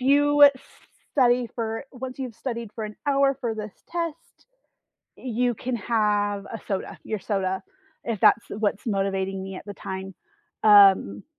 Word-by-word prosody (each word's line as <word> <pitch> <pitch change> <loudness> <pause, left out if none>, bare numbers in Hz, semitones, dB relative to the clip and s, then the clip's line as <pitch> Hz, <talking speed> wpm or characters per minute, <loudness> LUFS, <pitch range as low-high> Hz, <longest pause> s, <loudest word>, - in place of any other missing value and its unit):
you 290 +2 +4
s 285 - +9 0.6
study 245 -3 +3
for 225 +1 -3
once 255 0 -7
you've 255 -4 -5
studied 235 -4 -5
for 220 - -4
an 210 0 -8
hour 275 -1 +3
for 230 -2 -2
this 215 -1 -6 0.2
test, 335 -2 -5 0.7
you 245 0 -1
can 245 +3 -3
have 205 -2 0
a 225 +1 -8
soda 195 -2 -3
your 215 - -3
soda, 190 -1 -2 0.4
if 225 -4 -3
that's 230 - +5
what's 205 0 -2
motivating 195 -2 -1
me 190 0 -7
at - - -9
the 205 - -7
time. 190 0 -6 0.5
Um 195 - +6
220 Hz, 155 wpm, -25 LUFS, 200-250 Hz, 0.7 s, s